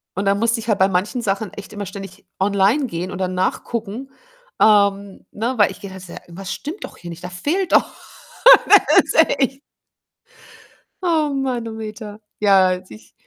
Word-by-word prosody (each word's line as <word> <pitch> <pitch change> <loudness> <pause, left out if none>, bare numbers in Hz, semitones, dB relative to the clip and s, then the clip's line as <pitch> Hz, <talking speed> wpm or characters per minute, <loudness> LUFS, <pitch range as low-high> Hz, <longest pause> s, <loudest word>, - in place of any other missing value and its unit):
und 195 - -2
dann 200 0 +2
musste 230 0 +1
ich 225 - -9
halt 210 - +2
bei 190 - +5
manchen 195 +7 -1
Sachen 200 -1 -2
echt 205 +1 -10
immer 205 -1 -5
ständig 195 0 -10
online 200 +8 +2
gehen 180 -4 -5
und - - -6
dann 185 -1 -2
nachgucken, 225 +6 -3 0.5
ähm, 200 -2 +2
ne 235 +5 -3
weil 205 - +4
ich - - -12
gehe 200 - -8
halt 190 -1 -10
so: 175 - -11
„Irgendwas 190 +3 -8
stimmt 315 +8 -7
doch - - -10
hier 170 - -10
nicht. 170 +1 -10
Da 180 - -5
fehlt 330 - -2
doch“ - - +4 0.8
Das - - +6
ist - - -5 0.2
echt. 265 0 -1 1.4
Oh 320 -4 +1
Manometer. 225 -5 -5 0.2
Ja, 195 -3 +5
als 185 0 -3
ich 110 0 -15
205 Hz, 175 wpm, -20 LUFS, 190-235 Hz, 1.4 s, Das